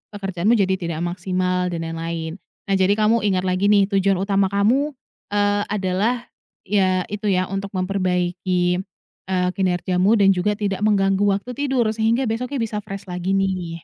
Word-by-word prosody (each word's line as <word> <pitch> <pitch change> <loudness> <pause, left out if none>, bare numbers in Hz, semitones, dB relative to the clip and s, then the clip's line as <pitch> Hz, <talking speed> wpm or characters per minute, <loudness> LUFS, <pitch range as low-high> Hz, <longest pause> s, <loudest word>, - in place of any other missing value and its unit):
pekerjaanmu 195 +2 +1
jadi 190 -3 +1
tidak 170 -1 -3
maksimal, 180 +1 -1
dan 170 -2 -3
lain-lain. 165 +1 -4 0.2
Nah, 195 - 0
jadi 190 +1 +4
kamu 215 +2 +3
ingat 185 -2 +1
lagi 185 +1 +1
nih, 205 -1 +5
tujuan 195 0 +2
utama 195 +1 +1
kamu, 240 +10 +1 0.3
eee, 205 0 +1
adalah 205 +4 0 0.4
ya 185 -2 +1
itu 210 0 -3
ya 185 -2 +1
untuk 195 0 -3
memperbaiki, 180 -1 0 0.5
eee, 185 -1 +1
kinerjamu 185 +2 +1
dan 200 -3 +5
juga 195 +3 0
tidak 200 -2 -2
mengganggu 195 -2 +2 0.2
waktu 205 +5 -6
tidur, 255 -4 0
sehingga 225 +3 +1
besoknya 250 +2 -2
bisa 215 -2 -3
fresh 195 -1 -8
lagi 180 +2 -1
nih. 185 -4 -2
195 Hz, 155 wpm, -21 LUFS, 180-210 Hz, 0.5 s, nih